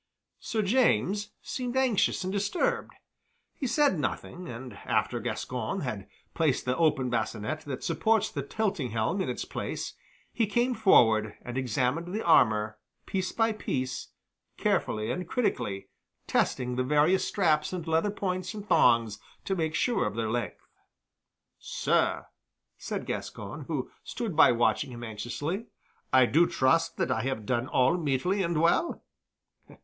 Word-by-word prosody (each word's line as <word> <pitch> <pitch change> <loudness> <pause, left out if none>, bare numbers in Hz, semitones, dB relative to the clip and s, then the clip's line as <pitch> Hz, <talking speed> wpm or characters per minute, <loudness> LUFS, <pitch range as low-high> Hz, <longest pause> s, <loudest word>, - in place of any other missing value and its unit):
Sir 220 -2 -1
James 205 - +2
seemed 250 0 -3
anxious 245 -7 +2
and 185 +1 -3
disturbed. 370 - -1 0.6
He 270 - -3
said 275 - +3
nothing, 175 +5 -4
and 125 +2 -7
after - - -1
Gascoyne - - -3
had - - -4 0.3
placed 155 -5 +1
the 125 0 +1
open 150 -6 +2
bascinet 120 +5 -2
that 140 -3 -5
supports 220 +6 +1
the 140 - -3
tilting 185 - -2
helm 115 - 0
in - - -2
its - - -3
place, - - -4 0.4
he 225 -2 +1
came 240 +5 +1
forward 110 - +4
and 120 - -6
examined 130 +6 0
the 220 - -3
armor 110 -9 +4 0.3
piece 190 -1 -2
by 225 0 +2
piece, 130 - -3 0.5
carefully 110 0 0
and 180 -1 -4
critically, 105 - -1 0.4
testing 125 -1 0
the 130 - +2
various 150 +7 +3
straps 155 -6 +1
and 175 -3 -5
leather 165 +5 +2
points 185 -2 -3
and 205 -1 -7
thongs 115 - +4 0.3
to 195 - 0
make 160 -3 -1
sure 240 - +1
of 105 - -5
their 115 -1 -1
strength. 115 -4 -3 0.9
"Sir," - - 0 0.5
said - - -5
Gascoyne, 105 +8 -5
who 145 -5 -3
stood 220 -8 -4
by 160 - +7
watching 120 +1 +1
him 120 -1 -8
anxiously, 145 - -4 0.4
"I 130 -1 +6
do 165 +7 +4
trust 165 +5 +2
that - - 0
I 115 - +1
have 125 -4 -3
done 120 +2 0
all 130 +7 +3
meetly 170 +5 0
and 170 -3 0
well." 170 - +2
155 Hz, 145 wpm, -28 LUFS, 125-195 Hz, 0.9 s, by